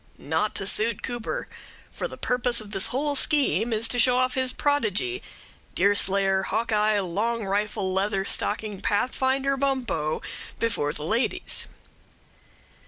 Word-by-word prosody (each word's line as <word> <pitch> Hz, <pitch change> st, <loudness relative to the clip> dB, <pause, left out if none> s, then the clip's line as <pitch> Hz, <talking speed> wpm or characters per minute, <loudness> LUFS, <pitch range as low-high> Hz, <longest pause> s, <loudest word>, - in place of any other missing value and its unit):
Not 160 Hz, +8 st, -1 dB
to 195 Hz, -, -1 dB
suit 220 Hz, +4 st, +2 dB
Cooper; 245 Hz, -, -4 dB, 0.4 s
for -, -, -4 dB
the -, -, -10 dB
purpose 245 Hz, -1 st, +1 dB
of 210 Hz, -2 st, -7 dB
this 195 Hz, -2 st, +1 dB
whole 285 Hz, +3 st, -1 dB
scheme 255 Hz, -, +2 dB
is 225 Hz, +1 st, +1 dB
to 245 Hz, -, +2 dB
show 250 Hz, +1 st, +4 dB
off 255 Hz, 0 st, +2 dB
his 260 Hz, -1 st, +1 dB
prodigy, 290 Hz, -, 0 dB, 0.5 s
Deerslayer 195 Hz, -1 st, +3 dB
Hawkeye 215 Hz, 0 st, +1 dB
Long 210 Hz, +5 st, -1 dB
Rifle 200 Hz, -1 st, -1 dB
Leather 195 Hz, 0 st, 0 dB
Stocking 210 Hz, -1 st, 0 dB
Pathfinder 265 Hz, +6 st, +1 dB
Bumppo 250 Hz, -, -1 dB, 0.3 s
before 225 Hz, -11 st, 0 dB
the 150 Hz, -, -7 dB
ladies. 225 Hz, +8 st, 0 dB
220 Hz, 130 wpm, -26 LUFS, 200-255 Hz, 0.5 s, show